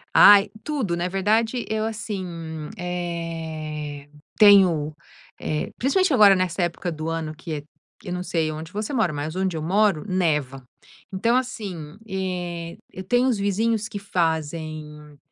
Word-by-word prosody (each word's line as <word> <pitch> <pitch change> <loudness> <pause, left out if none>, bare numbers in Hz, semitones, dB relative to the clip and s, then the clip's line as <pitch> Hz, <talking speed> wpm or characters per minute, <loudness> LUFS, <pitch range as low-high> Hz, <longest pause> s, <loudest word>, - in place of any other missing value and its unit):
Ai, 205 -1 +8
tudo 265 - -1
na 175 +1 -1
verdade 220 +6 +1
eu, 215 0 -1
assim, 175 -8 -5
eh, 160 -4 -5 0.3
tenho, 180 -8 +6 0.4
eh, 155 -1 -2
principalmente 320 +5 +2
agora 205 -5 +7
nessa 185 -1 -1
época 175 +1 -1
do 160 0 -4
ano 160 -1 -3
que 160 +1 -7
é, 145 - -6 0.4
que 180 - -8
não 180 - -2
sei 165 -3 -1
onde 160 +2 -7
você 210 +7 -4
mora, 220 -10 +2
mas 150 +2 -4
onde 190 -3 -1
eu 155 - -3
moro 195 0 +2
neva. 150 -8 0 0.5
Então, 230 +6 +1
assim, 195 -11 -3
eh, 180 -3 -4
eu 185 - -7
tenho 245 +6 +2
uns 235 -5 +1
vizinhos 215 +2 0
que 215 -1 -6
fazem, 155 -4 -3
180 Hz, 145 wpm, -24 LUFS, 160-205 Hz, 0.5 s, Ai